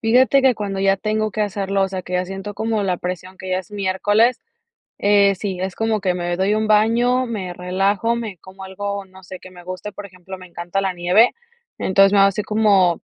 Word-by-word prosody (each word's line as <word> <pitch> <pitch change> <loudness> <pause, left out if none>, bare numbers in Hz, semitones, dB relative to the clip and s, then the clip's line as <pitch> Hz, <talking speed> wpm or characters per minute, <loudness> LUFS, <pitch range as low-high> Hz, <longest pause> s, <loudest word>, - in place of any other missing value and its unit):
Fíjate 255 +4 +4
que 260 -2 +4
cuando 195 -2 -3
ya 195 0 +3
tengo 215 +1 -1
que 215 +2 -1
hacerlo, 195 -1 -1
o 195 - +1
sea, 185 -1 -5
que 180 - -6
ya 180 0 +1
siento 195 +2 -7
como 220 -1 -1
la 185 -2 0
presión 185 +1 -6
que 185 - -7
ya 185 - +1
es 190 - -19
miércoles, 205 +4 +1 0.6
sí, 200 -2 +2
es 190 0 -3
como 225 -1 0
que 185 -2 0
me 175 -1 -2
doy 195 +3 +1
un 215 0 0
baño, 235 +4 +3
me 195 -6 -4
relajo, 195 +6 0
me 220 -5 -5
como 190 +3 -12
algo, 200 +1 -5
no 190 0 -17
sé, 185 +1 -9
que 185 - -13
me 180 -1 -14
guste, 185 +3 -7
por 205 - -8
ejemplo, 185 0 -11
me 185 - -12
encanta 175 +2 -3
la 195 -1 -1
nieve. 180 +6 +3 0.4
Entonces, 195 +1 +4
me 200 - +4
hago 195 - +6
así 195 +2 -2
como 200 -5 +2
195 Hz, 220 wpm, -20 LUFS, 185-215 Hz, 0.6 s, hago